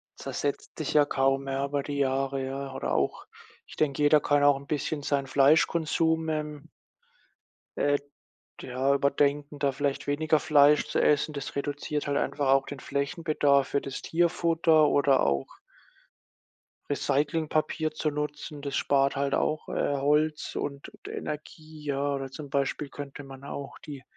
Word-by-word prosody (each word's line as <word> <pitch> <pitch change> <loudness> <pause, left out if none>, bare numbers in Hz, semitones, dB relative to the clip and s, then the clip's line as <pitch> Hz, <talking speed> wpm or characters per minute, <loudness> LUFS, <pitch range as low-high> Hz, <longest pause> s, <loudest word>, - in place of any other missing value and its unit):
zersetzt 145 -1 -4
sich 155 - -3
ja 150 -1 +5
kaum 135 0 +1
mehr 135 0 -1
über 140 0 -2
die 145 0 -4
Jahre, 135 0 0
ja. 135 0 -5
Oder 135 - -3
auch - - -1 0.4
ich - - -12
denke, 150 -1 0
jeder 150 0 +5
kann 145 0 +2
auch 145 -1 +5
'n 140 +1 -12
bisschen 150 0 -2
seinen 140 -1 0
Fleischkonsum, 160 +3 +3
ähm 150 -2 -4 1.1
äh, 145 0 +2 0.6
d - - -9
ja, 130 +2 +1
überdenken, 140 +1 +1
da 140 -1 +1
vielleicht 135 +1 -2
weniger 155 +2 +2
Fleisch 150 0 +5
zu 150 - -1
essen, 150 +1 +2
das 140 -2 -6
reduziert 145 +1 -3
halt 140 0 0
einfach 145 -2 -1
auch 135 0 +4
den 145 - -7
Flächenbedarf 140 -1 +1
für 140 - 0
das 135 -1 -6
Tierfutter. 165 -2 +3
Oder 140 -2 +3
auch 70 -1 0 1.4
Recyclingpapier 155 +2 0
zu 155 0 -1
nutzen. 150 0 -5
Das 140 -1 -4
spart 140 0 +2
halt 140 0 -1
auch, 155 0 -1
äh, 145 - 0
Holz 150 +2 +1
und 140 -1 -5
d - - -6
Energie, 155 0 -7
ja. 140 0 0
Oder, 135 -1 -5
zum 145 0 -8
Beispiel, 140 +1 -1
könnte 145 0 -8
man 135 0 -11
auch 140 0 -7
die 145 -4 -9
145 Hz, 155 wpm, -28 LUFS, 140-150 Hz, 1.4 s, ja